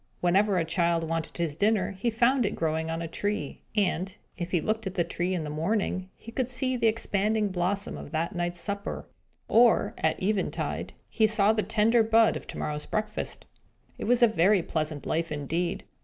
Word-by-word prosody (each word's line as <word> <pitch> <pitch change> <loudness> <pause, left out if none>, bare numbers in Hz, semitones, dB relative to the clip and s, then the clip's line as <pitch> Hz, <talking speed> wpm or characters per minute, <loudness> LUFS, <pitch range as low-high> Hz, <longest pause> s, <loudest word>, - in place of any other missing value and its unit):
Whenever 190 +3 +3
a 165 - +1
child 170 0 +1
wanted 165 0 -3
his 165 -4 -1
dinner, 205 +2 +2
he 195 +5 -1
found 240 +3 +3
it 210 - -1
growing 160 0 -1
on 165 +1 -2
a - - -3
tree; 205 +5 -3
and, 190 -2 0 0.2
if 175 -1 -4
he 180 - +2
looked 215 +3 -1
at 190 - -5
the 175 - +2
tree 175 +2 -2
in 170 - -2
the 150 - -5
morning, 185 +3 -1
he 230 - -11
could 255 +1 -1
see 255 0 0
the 235 -2 +2
expanding 215 -1 +1
blossom 190 +2 -1
of - - -9
that 165 +1 -2
night's 175 -1 -2
supper; 200 +2 -4 0.4
or, 235 0 +4
at 160 - +1
eventide, 200 +1 -2
he 220 -1 +2
saw 215 0 +3
the 215 - +1
tender 220 +3 +3
bud 225 0 +4
of - - -7
to - - -7
morrow's 150 0 -3
breakfast. 215 0 -3 0.5
It - - -3
was 245 +1 +3
a - - +9
very 195 -2 +3
pleasant 155 -3 -3
life 165 0 -1
indeed. 155 +4 -2
190 Hz, 195 wpm, -28 LUFS, 170-220 Hz, 0.5 s, a